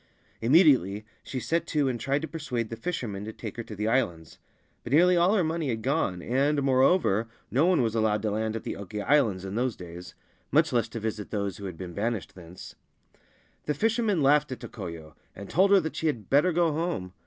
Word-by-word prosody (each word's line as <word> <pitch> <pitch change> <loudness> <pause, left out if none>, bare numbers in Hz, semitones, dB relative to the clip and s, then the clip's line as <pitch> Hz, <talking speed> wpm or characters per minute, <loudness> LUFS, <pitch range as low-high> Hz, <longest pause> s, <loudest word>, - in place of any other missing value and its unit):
Immediately 115 - +4 0.2
she 130 - -5
set 165 +6 -1
to 150 -3 +1
and 125 -2 -2
tried 140 +6 -1
to - - -2
persuade 125 -9 -4
the - - -3
fishermen 115 - -4
to 110 - -5
take 110 -1 -8
her 120 - -4
to 105 - -8
the 105 +2 -2
Islands; 90 - -1 0.4
but - - -7
nearly 180 +4 +6
all 175 +4 +4
her 190 - +3
money 160 -2 -1
had 110 -2 -3
gone, 130 - 0
and, 140 +3 +1
moreover, 130 - +3 0.2
no 145 +7 +3
one 180 -8 +3
was 110 -2 0
allowed 110 -2 +1
to 105 - 0
land 110 +1 -2
at 115 - -5
the - - -4
Oki 100 +1 -6
Islands 110 -9 +2
in 95 - -5
those 125 +1 -1
days 90 0 -10 0.2
— - - -39
much - - +3
less 115 -2 +1
to 115 - -5
visit 110 -1 -4
those 100 -3 -3
who 100 - -8
had 90 -4 -6
been 90 -1 -7
banished 105 -6 -3
thence. 90 0 -11 0.9
The 150 - 0
fishermen 220 - +1
laughed 150 +1 +3
at 130 - -5
Tokoyo, 85 -7 -8 0.2
and 100 - -9
told 190 +3 +4
her 200 0 +6
that 160 - -4
she 160 - -1
had 120 -9 -3
better 150 +6 +4
go 170 -1 +2
home. 150 - -3
120 Hz, 220 wpm, -27 LUFS, 105-150 Hz, 0.9 s, nearly